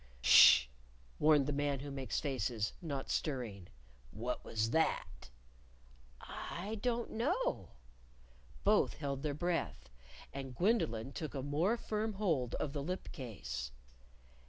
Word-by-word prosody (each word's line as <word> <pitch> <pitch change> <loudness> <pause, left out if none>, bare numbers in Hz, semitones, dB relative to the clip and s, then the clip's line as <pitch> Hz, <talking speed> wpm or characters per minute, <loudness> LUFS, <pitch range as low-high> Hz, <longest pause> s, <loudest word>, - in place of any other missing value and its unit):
_ - - -23 0.2
"Sh!" 65 +1 +9 0.5
warned 150 -2 +5
the 145 - -1
Man 140 -1 0
Who 145 0 -6
Makes 135 -2 -2
Faces, 120 -6 -1
not 140 -6 -4
stirring. 115 - -2 0.4
"What 120 - -4
was 110 0 -1
that!" 160 - 0 0.9
"I 205 +5 -6
don't 240 0 -1
know." 365 - -1 0.9
Both - - +3
held 140 -3 -3
their 145 -1 -2
breath. 175 - -2 0.4
And 135 -2 -6
Gwendolyn 135 - +1
took 155 +1 -5
a 135 - -3
more 160 - +1
firm 220 -1 -2
hold 160 - 0
of 140 - -3
the 145 - -2
lip 180 +6 -4
case. 80 - -5
145 Hz, 130 wpm, -35 LUFS, 125-175 Hz, 0.9 s, Sh